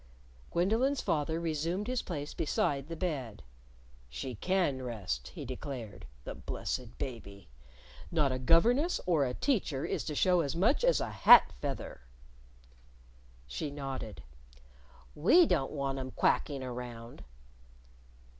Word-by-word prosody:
Gwendolyn's 225 +10 +1
father 160 +1 0
resumed 165 +4 -2
his 250 +1 -1
place 150 -4 -5
beside 140 -2 0
the 165 - -5
bed. 140 - -4 0.7
"She 70 - -5
can 170 - 0
rest," 100 - -4
he - - -8
declared, 120 -7 -7
" - - -26
the - - -5
blessed - - -5
baby! 100 - -7 0.6
Not 150 -5 +2
a 130 - -2
governess 235 - +3
or 160 -6 +3
a 125 -1 -3
teacher 185 - 0
is - - -2
to 150 - -4
show 180 +2 +3
as 145 -2 -2
much 215 - +2
as - - +4
a - - -3
hat - - +7
feather." 140 - -5 1.4
She 145 - -4
nodded. 135 - -6 0.9
"We 335 - +6
don't 135 - 0
want 135 -2 -2
'em 130 0 -4
quacking 135 +1 +1
around." 120 -2 -7
145 Hz, 130 wpm, -31 LUFS, 125-175 Hz, 1.4 s, hat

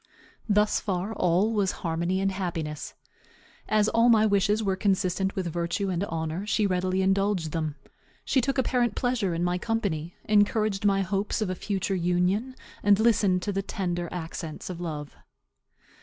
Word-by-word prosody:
Thus 210 +1 +3
far 195 +2 -2
all 185 +4 +2
was 200 -3 +1
harmony 170 +3 0
and 195 0 +1
happiness. 165 -5 -4 0.7
As 215 -1 +3
all 230 +2 +4
my 220 -2 +5
wishes 205 +1 +2
were 195 -2 +1
consistent 190 -1 0
with 190 - -2
virtue 175 +3 -1
and 180 +1 -1
honor, 160 +1 -3
she 215 0 +2
readily 185 0 0
indulged 195 -4 +1
them. 155 -2 -2 0.5
She 265 - +2
took 275 +3 -1
apparent 250 -2 +1
pleasure 230 -8 0
in 170 - -1
my 175 0 0
company, 180 -7 -2
encouraged 210 -1 +2
my 195 -1 +3
hopes 195 +4 -1
of 210 -4 -1
a - - 0
future 195 +1 -2
union, 180 +7 0 0.3
and 205 0 +4
listened 205 -5 +3
to 205 - -1
the 195 0 -1
tender 175 -3 -3
accents 165 -1 -6
of 175 -1 -7
love. 150 -4 -5
195 Hz, 160 wpm, -27 LUFS, 175-210 Hz, 0.7 s, my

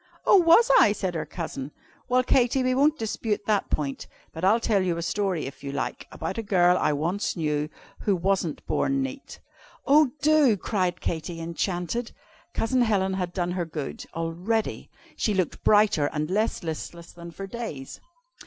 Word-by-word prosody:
"Oh, - - +7
was 370 +8 +6
I?" 205 - +5
said 190 -4 -3
her 160 -2 -3
Cousin. 150 -5 -6 0.4
"Well, 255 +1 +3
Katy, 255 +1 +2
we 255 0 +2
won't 295 +4 +3
dispute 215 -2 -2
that 210 -2 +1
point, 140 -3 -3 0.3
but 160 - -7
I'll 210 +5 +4
tell 215 -4 +1
you 180 -2 0
a 170 - -3
story, 190 -2 -1
if 135 - -9
you 140 - -4
like, 140 -1 -4
about 165 +7 -4
a - - 0
girl 180 -4 +3
I - - +2
once 170 +8 -1
knew, 150 -2 -1 0.3
who 200 - +1
wasn't 180 -3 -1
born 275 -1 0
neat." 270 +1 -7 0.5
"Oh, 295 0 +5
do!" 295 -7 +5
cried 180 -3 -1
Katy, 165 +1 -3
enchanted. 175 +7 -3 0.4
Cousin 255 +3 +1
Helen 195 -5 +1
had 180 -2 -2
done 175 -1 -2
her 180 -1 -2
good, 155 -4 -6
already. 175 +7 -2 0.3
She 210 - 0
looked 185 -4 -1
brighter 205 -8 +4
and 155 +2 -3
less 215 +1 0
listless 170 +1 -6
than 170 0 -10
for 180 +4 -7
days. 195 - -7
190 Hz, 170 wpm, -26 LUFS, 165-225 Hz, 0.5 s, Oh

